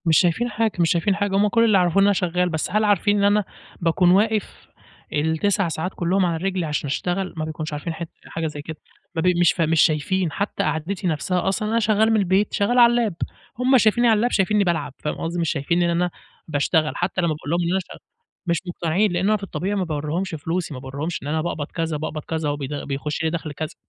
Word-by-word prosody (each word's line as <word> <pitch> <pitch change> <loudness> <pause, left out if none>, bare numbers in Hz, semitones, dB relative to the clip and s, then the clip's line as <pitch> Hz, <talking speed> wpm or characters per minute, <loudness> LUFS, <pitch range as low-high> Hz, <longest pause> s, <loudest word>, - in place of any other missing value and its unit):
مش 160 -2 +4
شايفين 185 +8 +1
حاجة، 220 0 0
مش 170 -1 +3
شايفين 180 +3 +2
حاجة، 205 -1 -1
هُم 205 +2 +4
كُلّ 230 +2 +3
اللي 215 -3 +4
يعرفوه 180 +1 +3
إن 200 - +5
أنا 205 - +4
شغال، 180 -1 0
بس 160 0 -3
هل 215 +2 +2
عارفين 205 0 +3
إن 200 - +1
أنا 205 +1 +4 0.4
باكون 175 +1 +3
واقف 215 +2 +1 0.5
ال9 160 +6 +1
ساعات 165 +3 -3
كلّهم 185 +2 +1
على 170 -2 0
رجلي 190 -3 -1
عشان 150 -1 -2
أشتغل؟ 180 +6 -2
ما 155 - -2
بيكونش 155 0 -5
عارفين 150 +3 -4
حت 165 0 -6 0.2
حاجة 165 0 -3
زي 150 -1 -6
كده، 160 +1 -8 0.4
ما 165 - 0
بي 180 +2 +3
مش 175 - +5
ف 170 - -3
مش 160 0 +3
شايفين 165 +3 +1
حتى 200 +7 -2
قعدتي 165 +5 -2
نَفْسَها 175 +3 -1
أصلًا، 210 +2 0
أنا 230 +1 +2
شغال 215 0 +3
من 220 - +3
البيت، 195 +1 +1
شغال 240 +5 +2
على 235 -1 +8
اللاب، 235 -5 +1 0.5
هُم 260 +1 +4
شايفينني 235 +2 +3
على 225 - +5
اللاب 240 +3 +1
شايفنني 205 +1 +2
بالعب، 170 -6 -1
فاهم 150 - -3
قصدي، 170 +1 -3
مش 165 - 0
شايفين 170 +4 0
إن 170 - +2
أنا 175 +1 +1 0.4
باشتغل، 155 +1 +1
حتى 180 +1 -1
لما 170 -2 +1
باقول 150 -1 -8
لهم 170 - +2
إن 170 - 0
أنا 190 - +2
شغ - - -8 0.5
مش 170 -2 0
مقتنعين، 175 +4 0
لأن 175 +2 0
أنا 215 0 +3
في 205 - -12
الطبيعي 195 +1 -3
ما 195 - 0
باوريهمش 160 +3 -2
فلوسي، 165 +2 -3
ما 130 - -6
باوريهمش 140 +6 -5
إن - - -6
أنا 155 +2 0
باقبض 155 -3 -3
كذا، 165 -2 -3
باقبض 155 0 -5
كذا، 160 -2 -2
وبيد 145 -1 -4
بيخش 145 +2 -3
لي 160 - +2
دخل 160 -2 -4
كذا، 155 +3 -5
175 Hz, 235 wpm, -22 LUFS, 160-200 Hz, 0.5 s, على